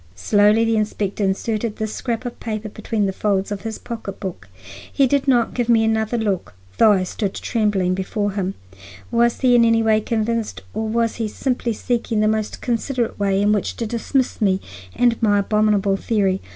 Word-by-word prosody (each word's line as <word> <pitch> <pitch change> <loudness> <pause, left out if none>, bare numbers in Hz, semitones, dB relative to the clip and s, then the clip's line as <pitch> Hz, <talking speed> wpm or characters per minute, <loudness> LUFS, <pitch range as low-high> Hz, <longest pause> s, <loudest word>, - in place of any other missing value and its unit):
Slowly 205 - +3
the 225 -1 +2
inspector 210 -1 -1
inserted 210 +3 -1
this 215 0 -4
scrap 235 -1 -3
of 245 - -6
paper 215 -1 -4
between 215 0 -2
the 190 - -1
folds 200 0 0
of 200 -2 -3
his 220 +1 -5
pocketbook. 195 - -7 0.4
He 275 - +3
did 280 +2 +1
not 240 -3 +3
give 240 -1 -1
me 225 -1 +5
another 220 +1 0
look, 200 - -2 0.2
though 215 -2 +7
I 190 -2 +1
stood 190 +1 -3
trembling 205 -5 0
before 205 +2 -2
him. 195 -1 -3 0.6
Was 235 0 +2
he 255 -2 +4
in 240 -1 +6
any 230 0 +3
way 220 -1 +3
convinced 225 0 -2
or 220 +1 -2
was 230 +1 0
he 225 -2 -1
simply 245 +1 -2
seeking 235 0 -2
for - - +3
the 215 0 +3
most 215 -1 -4
considerate 240 -1 -2
way 195 -1 +1
in 205 - +3
which 210 -2 0
to 230 - -3
dismiss 240 +3 -1
me 190 -2 +3 0.4
and 240 -2 +2
my 205 -2 +3
abominable 205 -1 +2
theory? 195 -3 0
215 Hz, 190 wpm, -21 LUFS, 205-230 Hz, 0.6 s, though